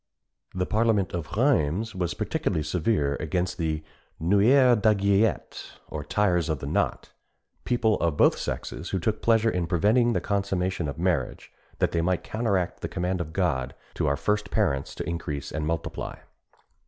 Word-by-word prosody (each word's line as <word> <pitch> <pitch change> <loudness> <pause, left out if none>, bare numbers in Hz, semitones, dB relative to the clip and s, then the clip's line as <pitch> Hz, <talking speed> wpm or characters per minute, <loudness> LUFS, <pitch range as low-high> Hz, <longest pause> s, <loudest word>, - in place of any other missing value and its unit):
The 90 0 0
parliament 110 -3 +1
of 85 +2 -5
Rheims 110 - +2
was 90 -2 -2
particularly 75 - -1
severe 75 -2 0
against 90 +4 -2
the 80 -2 -1 0.4
noueurs 115 - +4
d'aiguillette, 100 0 +1 0.2
or 75 -1 -5
"tyers 90 0 +1
of 80 - 0
the 70 - -7
knot" 70 - -1 0.5
people 115 -3 +2
of 80 -3 0
both - - +5
sexes 75 +7 -5
who 95 - -1
took 105 +5 -1
pleasure 115 -1 +3
in 90 -2 -1
preventing 110 +8 +3
the - - +1
consummation 95 -4 -1
of 70 - -5
marriage, 90 0 -1 0.3
that - - +1
they 85 - +1
might 90 +1 0
counteract 100 -6 -1
the - - -3
command 90 +1 -1
of 80 -2 -5
God 75 -8 -1 0.2
to - - -1
our 70 0 +1
first 105 0 -1
parents 70 0 0
to - - -5
increase 80 -4 -4
and 75 0 -3
multiply. 80 -1 -3
90 Hz, 160 wpm, -26 LUFS, 80-105 Hz, 0.5 s, both